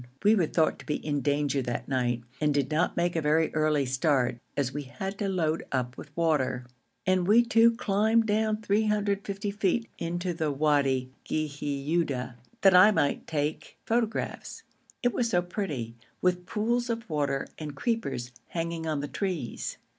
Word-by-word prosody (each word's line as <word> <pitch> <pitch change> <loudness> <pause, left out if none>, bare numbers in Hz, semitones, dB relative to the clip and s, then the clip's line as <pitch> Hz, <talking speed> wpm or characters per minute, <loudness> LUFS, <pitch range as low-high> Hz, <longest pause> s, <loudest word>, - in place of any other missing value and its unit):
We 210 - +6
were 185 -7 +3
thought 160 0 +1
to - - -12
be 150 - 0
in 145 -2 -2
danger 145 -1 +1
that 120 -1 -3
night, 120 -3 0 0.2
and 150 -1 +3
did 140 -1 0
not 160 +4 +1
make 175 0 +1
a 165 - +1
very 155 +1 +2
early 155 -2 +2
start, 130 -2 +1 0.2
as 135 -2 0
we 145 - -3
had 195 +8 -6
to 200 - 0
load 165 -4 0
up 125 -2 -1 0.2
water; 135 -7 +1 0.4
and 185 -1 +2
we 225 +4 +6
two 230 0 +5
climbed 220 +1 +2
down 215 0 +1
350 205 -1 0
feet 210 +3 0
into 175 +2 -2
the 160 -2 -1
Wadi 140 -3 +1
Ghiuda, 145 -2 -1 0.3
that 195 -1 +6
I 185 +4 +9
might 145 -9 0
take 150 0 -3
photographs. 230 - -2 0.4
It 245 - +2
was 235 -2 0
so 175 -5 +2
pretty, 155 - -4 0.3
with 180 -1 0
pools 240 +3 0
of 230 0 -3
water 145 -4 -1
and 150 -2 -6
creepers 185 - -2 0.2
hanging 165 -1 -3
on 155 -2 -1
the 145 - -3
trees. 180 - -3
165 Hz, 160 wpm, -28 LUFS, 145-205 Hz, 0.4 s, I